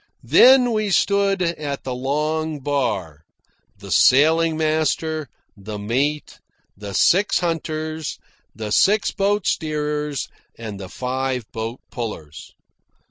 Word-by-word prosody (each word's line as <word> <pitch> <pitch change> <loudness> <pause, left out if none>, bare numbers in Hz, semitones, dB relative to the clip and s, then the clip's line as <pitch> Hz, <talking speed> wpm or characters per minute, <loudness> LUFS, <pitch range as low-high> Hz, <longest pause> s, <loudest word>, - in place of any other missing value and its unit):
There 265 +2 +7
we 215 -3 0
stood 200 0 +2
at 150 -5 -3
the 130 - -4
long 150 +4 -2
bar 110 - -2 0.6
the - - -10
sailing 160 +4 +4
master, 155 -1 -1 0.3
the 105 +1 -7
mate, 135 +9 -2 0.4
the 100 -1 -7
six 195 +4 +3
hunters, 160 -2 -3 0.4
the 105 0 -5
six 205 - +3
boat 200 0 0
steerers, 150 -2 -2 0.3
and 110 -3 -7
the 95 -2 -8
five 130 +4 -3
boat 115 +2 -5
pullers. 80 - -7
150 Hz, 110 wpm, -21 LUFS, 120-160 Hz, 0.6 s, There